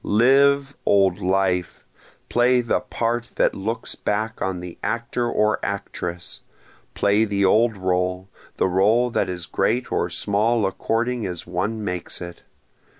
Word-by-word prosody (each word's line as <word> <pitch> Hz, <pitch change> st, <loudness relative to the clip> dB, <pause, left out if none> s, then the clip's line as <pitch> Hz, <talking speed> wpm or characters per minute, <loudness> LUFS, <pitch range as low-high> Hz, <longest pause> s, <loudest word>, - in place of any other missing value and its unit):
Live, 140 Hz, +5 st, +3 dB
old 95 Hz, -3 st, +3 dB
life! 90 Hz, -1 st, 0 dB, 0.4 s
play 125 Hz, +1 st, +3 dB
the 120 Hz, -, 0 dB
part 120 Hz, 0 st, -2 dB
that -, -, +2 dB
looks 110 Hz, +4 st, -3 dB
back 110 Hz, +2 st, -3 dB
on 95 Hz, -2 st, -1 dB
the 90 Hz, -1 st, -8 dB
actor 120 Hz, +1 st, -2 dB
or 105 Hz, -2 st, +1 dB
actress! 90 Hz, -3 st, -5 dB, 0.6 s
Play 100 Hz, +2 st, +3 dB
the 100 Hz, -2 st, +1 dB
old 110 Hz, +2 st, +3 dB
role, 90 Hz, 0 st, -1 dB, 0.3 s
the -, -, +1 dB
role 110 Hz, +7 st, +3 dB
that -, -, 0 dB
is 90 Hz, -2 st, -5 dB
great 125 Hz, +9 st, -1 dB
or -, -, 0 dB
small 105 Hz, +2 st, +1 dB
according 115 Hz, +4 st, -1 dB
as 90 Hz, -3 st, -6 dB
one 100 Hz, +5 st, -2 dB
makes 90 Hz, -3 st, -4 dB
it! 85 Hz, -1 st, -8 dB
105 Hz, 140 wpm, -22 LUFS, 90-120 Hz, 0.6 s, Live